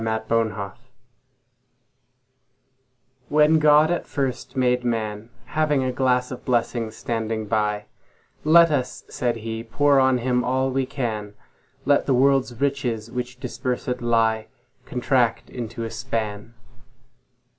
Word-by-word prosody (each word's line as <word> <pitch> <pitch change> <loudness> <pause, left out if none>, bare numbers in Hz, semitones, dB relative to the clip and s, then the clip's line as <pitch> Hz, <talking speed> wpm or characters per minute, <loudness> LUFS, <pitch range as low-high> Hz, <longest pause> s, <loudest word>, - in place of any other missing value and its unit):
The 110 0 0
Pulley 110 -4 0 2.6
WHEN 150 +2 +5
God 150 +1 +5
at 175 - -2
first 135 -2 -3
made 125 -1 +2
Man, 110 -2 -2 0.2
Having 150 -1 +1
a 130 - 0
glass 125 0 +1
of 125 - -7
blessings 115 -2 -1
standing 110 -1 -3
by—Let 110 +10 +1
us 130 -4 -2
(said 120 -1 -1
He) 115 0 -5
pour 140 +4 +3
on 130 -1 +4
him 125 0 0
all 130 +1 0
we 130 0 0
can; 110 -6 -4 0.5
Let 145 0 +3
the 135 - +3
world's 130 -2 +2
riches, 125 -5 -1
which 125 0 -5
dispersèd 125 -1 -3
lie, 115 -2 +1 0.4
Contract 125 -2 0
into 115 -1 -5
a 115 - -4
span. 115 -1 -4
125 Hz, 120 wpm, -23 LUFS, 115-135 Hz, 2.6 s, WHEN